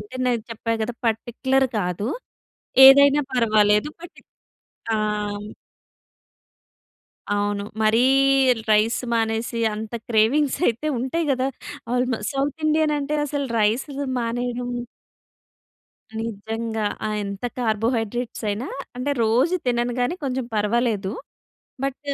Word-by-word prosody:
అంటే, 210 +5 -9
నేను 240 -3 +1
చెప్పా 230 0 -3
గదా! 235 +1 -3
పర్టిక్యులర్ 260 +4 +1
కాదు. 180 +3 -2 0.8
ఏదైనా 280 +2 +7
పర్వాలేదు, 215 +1 +3
బట్ 350 0 -12 0.8
ఆహ్ 210 -1 -2 1.9
అవును. 205 0 0 0.2
మరీ 215 +2 +4 0.6
ల్ - - -7
రైస్ 215 +2 +3
మానేసి 225 +1 -1 0.2
అంత 220 +1 -6 0.2
క్రేవింగ్సయితే 245 +4 +2
ఉంటాయి 285 +7 -1
గదా! 260 0 +1 0.5
ఆల్మ 250 -2 0
సౌత్ 280 +3 -2
ఇండియనంటే 300 -1 +1
అసలు 285 -1 -2
రైససలు 270 +7 0
మానేయడం. 245 +1 -2 1.5
నిజ్జంగా. 225 0 -3 0.2
ఆహ్, 215 0 -2
ఎంత 200 +2 -6 0.2
కార్బోహైడ్రేట్స్ 225 +1 -1
అయినా 210 +6 -3 0.3
అంటే, 255 +3 -2
రోజు 245 +10 +2
తినను 240 0 0
గానీ, 245 +7 +1
కొంచెం 260 -1 -2
పర్వాలేదు. 210 -2 0 0.7
బట్ 275 -1 -2
235 Hz, 100 wpm, -23 LUFS, 215-265 Hz, 1.9 s, ఏదైనా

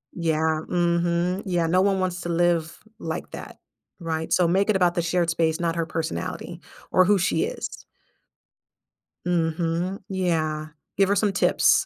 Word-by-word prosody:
Yeah, 160 -2 +1
mhm, 175 +1 +1
yeah, 175 -3 +1
no 180 +3 +3
one 195 -1 +2
wants 185 -1 -2
to 175 - -5
live 170 -1 +1 0.2
like - - -5
that. - - -9 0.4
Right, 160 -1 -2
so 180 - +4
make 195 +5 +2
it 215 - +3
about 180 -2 +3
the 175 - +1
shared 170 0 +1
space, 165 -1 +1
not 170 -1 0
her 165 - 0
personality, 120 - -4 0.3
or 185 - +5
who 205 +2 +4
she 185 - +1
is. - - -6 1.4
Mhm, 170 +2 0
yeah, 160 -5 -1 0.3
give 195 0 +4
her 200 - +3
some 205 +1 +2
tips. 190 - +3
175 Hz, 155 wpm, -24 LUFS, 165-185 Hz, 1.4 s, or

